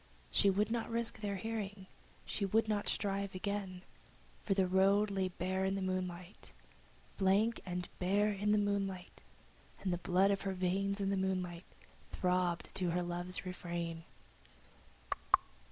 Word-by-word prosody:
She 200 Hz, -, +5 dB
would 205 Hz, +3 st, +2 dB
not 235 Hz, -1 st, -1 dB
risk 235 Hz, 0 st, -2 dB
their 200 Hz, -2 st, -1 dB
hearing, 205 Hz, -2 st, -4 dB, 0.4 s
she 205 Hz, -, -2 dB
would 220 Hz, +3 st, +3 dB
not 210 Hz, -1 st, 0 dB
strive 200 Hz, -1 st, 0 dB
again, 190 Hz, -1 st, -3 dB, 0.6 s
For 195 Hz, -, +1 dB
the 190 Hz, -1 st, +4 dB
road 195 Hz, +3 st, +4 dB
lay 190 Hz, -1 st, +1 dB
bare 185 Hz, +1 st, -1 dB
in 190 Hz, 0 st, +1 dB
the 195 Hz, -, -2 dB
moonlight, 185 Hz, 0 st, -4 dB, 0.7 s
Blank 200 Hz, +4 st, +3 dB
and 180 Hz, 0 st, -2 dB
bare 205 Hz, +3 st, +3 dB
in 205 Hz, +1 st, 0 dB
the 210 Hz, -, +5 dB
moonlight, 195 Hz, -3 st, -1 dB, 0.6 s
And 185 Hz, -2 st, +1 dB
the 175 Hz, -, -2 dB
blood 185 Hz, +3 st, +3 dB
in 200 Hz, -, +2 dB
her 195 Hz, -1 st, -2 dB
veins, 195 Hz, +2 st, 0 dB
in 195 Hz, 0 st, +1 dB
the 195 Hz, -, +1 dB
moonlight, 185 Hz, -2 st, -1 dB, 0.4 s
throbbed 180 Hz, -2 st, 0 dB
to 180 Hz, -2 st, +1 dB
her 175 Hz, +1 st, +1 dB
love's 175 Hz, +2 st, -3 dB
refrain. 170 Hz, -2 st, -4 dB
190 Hz, 150 wpm, -35 LUFS, 180-200 Hz, 0.7 s, She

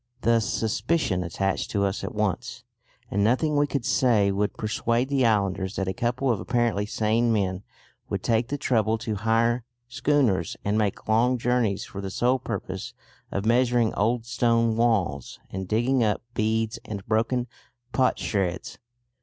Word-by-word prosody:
Thus 115 Hz, -1 st, +2 dB
suspicion 110 Hz, -, 0 dB
attached 95 Hz, +3 st, -2 dB
to 100 Hz, -1 st, +1 dB
us 95 Hz, 0 st, -2 dB
at -, -, -5 dB
once, -, -, -2 dB, 0.5 s
and 100 Hz, +1 st, +1 dB
nothing 130 Hz, +8 st, +2 dB
we 145 Hz, 0 st, +3 dB
could 140 Hz, -5 st, -2 dB
say 110 Hz, -6 st, +3 dB
would 100 Hz, +1 st, -1 dB
persuade 115 Hz, +3 st, 0 dB
the 135 Hz, -4 st, +3 dB
islanders 100 Hz, -3 st, 0 dB
that 95 Hz, -, -2 dB
a 95 Hz, -, -1 dB
couple 120 Hz, +5 st, 0 dB
of 110 Hz, -, -1 dB
apparently 115 Hz, -4 st, 0 dB
sane 115 Hz, +2 st, +1 dB
men 95 Hz, -4 st, 0 dB, 0.5 s
would -, -, -3 dB
take 115 Hz, 0 st, +1 dB
the 145 Hz, -, -3 dB
trouble 110 Hz, -4 st, +1 dB
to 110 Hz, 0 st, -3 dB
hire 115 Hz, +3 st, +1 dB, 0.2 s
schooners 125 Hz, -, +1 dB
and 100 Hz, +1 st, +1 dB
make 105 Hz, -2 st, -1 dB
long 120 Hz, +4 st, +3 dB
journeys 120 Hz, -4 st, 0 dB
for 100 Hz, -, -7 dB
the 95 Hz, -, -4 dB
sole 125 Hz, +6 st, +1 dB
purpose 115 Hz, +3 st, -5 dB, 0.4 s
of 100 Hz, +1 st, -2 dB
measuring 120 Hz, -1 st, +3 dB
old 115 Hz, +2 st, 0 dB
stone 115 Hz, -1 st, +2 dB
walls 105 Hz, -, 0 dB
and 95 Hz, 0 st, -4 dB
digging 120 Hz, +5 st, +2 dB
up 105 Hz, 0 st, 0 dB
beads 110 Hz, 0 st, 0 dB
and 100 Hz, -3 st, -7 dB
broken 115 Hz, +3 st, +1 dB, 0.5 s
potsherds. 100 Hz, -8 st, 0 dB
115 Hz, 155 wpm, -25 LUFS, 100-120 Hz, 0.5 s, we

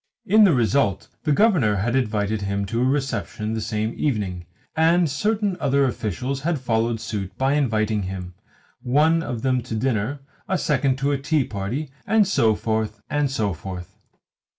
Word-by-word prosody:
In 215 Hz, +1 st, +6 dB
the 185 Hz, -, +5 dB
result 120 Hz, -3 st, +1 dB, 0.2 s
the 150 Hz, -, +2 dB
Governor 150 Hz, -, +3 dB
had 115 Hz, +6 st, 0 dB
invited 110 Hz, -4 st, 0 dB
him 100 Hz, 0 st, -1 dB
to 115 Hz, +4 st, -2 dB
a -, -, +3 dB
reception 130 Hz, -5 st, -1 dB
the 110 Hz, -, -2 dB
same 110 Hz, +1 st, -2 dB
evening, 95 Hz, -, -2 dB, 0.3 s
and 165 Hz, +2 st, +4 dB
certain 205 Hz, +6 st, 0 dB
other 140 Hz, 0 st, +2 dB
officials 125 Hz, +2 st, -2 dB
had 165 Hz, +2 st, 0 dB
followed 115 Hz, -2 st, 0 dB
suit 105 Hz, -4 st, -5 dB
by 135 Hz, +1 st, +2 dB
inviting 110 Hz, -7 st, +1 dB
him, 90 Hz, -1 st, -5 dB, 0.5 s
one 155 Hz, +6 st, +3 dB
of 125 Hz, -7 st, -4 dB
them 130 Hz, -2 st, +2 dB
to 115 Hz, -1 st, -5 dB
dinner, 125 Hz, +3 st, -1 dB, 0.3 s
a 190 Hz, -, +2 dB
second 140 Hz, -5 st, +1 dB
to 140 Hz, +1 st, 0 dB
a 140 Hz, -, 0 dB
tea 150 Hz, +1 st, +1 dB
party, 115 Hz, +8 st, -4 dB, 0.2 s
and 215 Hz, -1 st, +4 dB
so 115 Hz, -, +3 dB
forth, 110 Hz, 0 st, -2 dB
and 145 Hz, -1 st, +1 dB
so 110 Hz, -7 st, -1 dB
forth. 90 Hz, +2 st, -8 dB
125 Hz, 170 wpm, -23 LUFS, 105-145 Hz, 0.5 s, In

